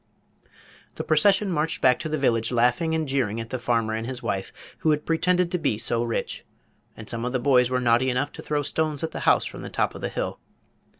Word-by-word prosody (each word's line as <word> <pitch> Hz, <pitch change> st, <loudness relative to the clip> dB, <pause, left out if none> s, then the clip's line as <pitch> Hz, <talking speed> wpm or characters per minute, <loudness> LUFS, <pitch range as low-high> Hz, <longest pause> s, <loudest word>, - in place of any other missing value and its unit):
The -, -, -4 dB
procession 195 Hz, +5 st, +3 dB
marched 160 Hz, 0 st, 0 dB
back 125 Hz, -1 st, +4 dB
to 160 Hz, -, -4 dB
the 155 Hz, -, -1 dB
village 115 Hz, -4 st, +1 dB
laughing 125 Hz, +7 st, +2 dB
and 160 Hz, -1 st, -1 dB
jeering 125 Hz, -5 st, 0 dB
at 115 Hz, 0 st, -7 dB
the 130 Hz, -, -2 dB
farmer 115 Hz, -2 st, 0 dB
and 110 Hz, +1 st, -3 dB
his 130 Hz, -1 st, -5 dB
wife, 95 Hz, -1 st, -2 dB, 0.3 s
who 160 Hz, -, +1 dB
had 150 Hz, -1 st, +1 dB
pretended 180 Hz, +1 st, +2 dB
to 180 Hz, -, 0 dB
be 140 Hz, -9 st, 0 dB
so 115 Hz, +2 st, +1 dB
rich; 115 Hz, -1 st, -3 dB, 0.5 s
and 110 Hz, -, -9 dB
some 115 Hz, 0 st, -3 dB
of 125 Hz, +1 st, -2 dB
the 130 Hz, -, +1 dB
boys 125 Hz, -1 st, +4 dB
were 125 Hz, 0 st, +1 dB
naughty 120 Hz, +1 st, +3 dB
enough 130 Hz, +3 st, -1 dB
to -, -, -9 dB
throw 145 Hz, -1 st, -1 dB
stones 150 Hz, +1 st, -1 dB
at 160 Hz, -, -2 dB
the -, -, -5 dB
house -, -, +4 dB
from -, -, -7 dB
the -, -, -7 dB
top -, -, 0 dB
of -, -, -9 dB
the -, -, -2 dB
hill. -, -, -4 dB
130 Hz, 235 wpm, -25 LUFS, 120-155 Hz, 0.5 s, back